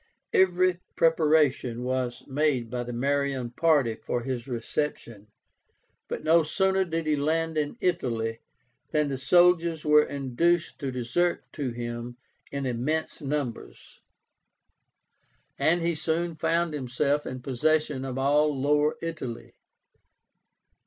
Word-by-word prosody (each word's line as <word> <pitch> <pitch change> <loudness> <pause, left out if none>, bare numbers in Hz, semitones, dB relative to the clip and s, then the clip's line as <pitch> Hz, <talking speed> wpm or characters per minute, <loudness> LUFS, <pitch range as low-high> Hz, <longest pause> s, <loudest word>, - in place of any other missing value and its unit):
Every 185 -1 +3 0.2
preparation 150 -7 +2
was 125 -1 -2
made 135 -5 0
by 125 -1 -2
the 120 0 -5
Marian 135 0 -1
party 145 -5 +2
for 120 +2 -3
his 125 -1 -4
reception; 115 -3 -4 0.8
but - - -5
no 165 +2 +5
sooner 190 +4 +1
did 165 -1 -3
he 155 -1 +2
land 160 +3 0
in 150 +7 -1
Italy 115 - -1 0.5
than 150 -2 +1
the 135 -2 -3
soldiers 170 0 +3
were 150 0 +6
induced 145 +6 0
to 140 - -3
desert 130 +8 0
to 140 -5 -3
him 120 0 -6 0.3
in 140 -1 -3
immense 130 +8 -2
numbers, 135 - -5 1.6
and 170 +1 +2
he 170 0 +1
soon 165 +2 -1
found 165 0 0
himself 140 +2 -1
in 130 - -5
possession 145 +1 0
of 130 -1 -4
all 145 +1 +2
Lower 150 +2 +2
Italy. 155 -8 -6
145 Hz, 120 wpm, -27 LUFS, 125-160 Hz, 1.6 s, were